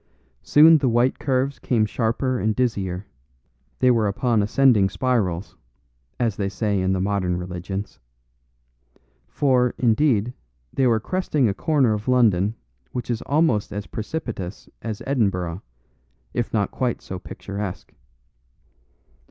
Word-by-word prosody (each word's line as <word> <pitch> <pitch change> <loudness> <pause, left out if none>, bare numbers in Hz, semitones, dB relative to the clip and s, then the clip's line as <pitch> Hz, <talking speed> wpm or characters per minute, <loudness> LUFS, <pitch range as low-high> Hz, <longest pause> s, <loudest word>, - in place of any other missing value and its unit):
Soon 160 +2 +6
the 135 -3 +1
white 120 +2 +2
curves 135 0 0
came 115 -4 +1
sharper 115 +4 -1
and 110 0 0
dizzier; 100 -6 -1 0.7
they 130 -1 +4
were 115 -3 +2
upon 110 +2 +1
ascending 105 -2 +4
spirals, 95 -8 -1 0.6
as 115 -5 0
they 100 -1 -1
say 100 -1 -1
in 95 0 +1
the 95 - 0
modern 95 -2 0
religions. 90 +3 -5 1.3
For, 125 -3 +2
indeed, 120 -1 +2 0.4
they 130 - +2
were 115 -2 +3
cresting 150 - 0
a 100 - 0
corner 135 -3 +2
of 105 +2 -4
London 110 -5 +3 0.4
which 125 0 -4
is 115 - -2
almost 140 -8 +2
as 105 0 -4
precipitous 110 - -5
as 110 -2 -5
Edinburgh, 95 -9 0 0.7
if 120 -2 -2
not 105 -3 0
quite 125 -2 -2
so 95 - -6
picturesque. 100 +1 -7
110 Hz, 125 wpm, -23 LUFS, 100-125 Hz, 1.3 s, Soon